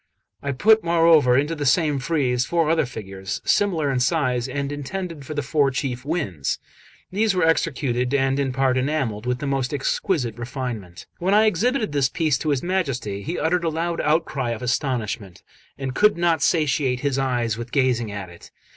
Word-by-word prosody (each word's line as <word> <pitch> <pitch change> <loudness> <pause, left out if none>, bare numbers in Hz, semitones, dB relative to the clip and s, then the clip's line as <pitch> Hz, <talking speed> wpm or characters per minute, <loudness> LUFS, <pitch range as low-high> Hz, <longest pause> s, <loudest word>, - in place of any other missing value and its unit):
I 140 - -2
put, 215 +11 +4
moreover, 165 -6 +5
into 145 +4 +1
the 150 -3 -4
same 145 0 +2
frieze 130 -4 0
four 165 +1 +1
other 165 -5 +2
figures, 95 -4 -6
similar 165 -8 +2
in 130 - 0
size, 125 -3 +1
and 140 0 -3
intended 150 0 -5
for 155 - -5
the 145 - -1
four 145 0 +2
chief 130 -1 -3
winds; 130 - -2 0.5
these 205 +1 +1
were 180 -2 +3
executed, 130 -6 0
and 135 -1 +1
in 135 -2 0
part 130 0 +1
enamelled, 125 -6 -2
with 125 0 0
the 140 - -5
most 135 0 -1
exquisite 130 - -1
refinement. 120 -8 -6
1 175 - -6
When 205 - +6
I 220 - +5
exhibited 215 - +1
this 140 -2 +2
piece 155 -6 0
to 155 - -2
his 140 -3 0
Majesty, 135 - -2
he 165 - -4
uttered 170 +2 +1
a 165 - +1
loud 165 +2 -2
outcry 150 -5 0
of 115 0 -4
astonishment, 115 -7 -2 0.3
and 135 -2 -4
could 210 +4 +4
not 170 -1 +2
satiate 135 -5 +1
his 140 -2 0
eyes 120 -4 0
with 120 +1 -7
gazing 125 -5 +1
at 100 -3 -6
it. 85 - -14
140 Hz, 185 wpm, -23 LUFS, 125-165 Hz, 0.5 s, When